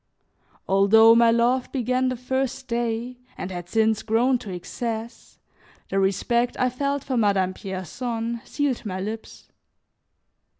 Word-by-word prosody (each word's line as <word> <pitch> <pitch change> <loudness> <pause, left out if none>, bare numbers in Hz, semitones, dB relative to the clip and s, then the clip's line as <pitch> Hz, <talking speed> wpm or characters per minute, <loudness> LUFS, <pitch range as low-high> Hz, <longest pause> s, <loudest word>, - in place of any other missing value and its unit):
Although 210 +4 +6
my 235 0 +5
love 240 +2 +2
began 255 0 0
the 255 - -2
first 260 +1 -3
day 235 +1 -2 0.2
and 190 - -5
had 175 -1 -7
since 220 +1 +2
grown 240 +3 +2
to 210 - -9
excess, 225 +5 -6 0.5
the 195 - 0
respect 235 +5 +1
I 255 0 +2
felt 280 +2 -2
for 260 -2 -2
Madame 200 -4 +2
Pierson 225 +5 -4
sealed 285 -4 -2
my 190 -4 -4
lips. 220 +3 -7
230 Hz, 130 wpm, -24 LUFS, 205-250 Hz, 0.5 s, Although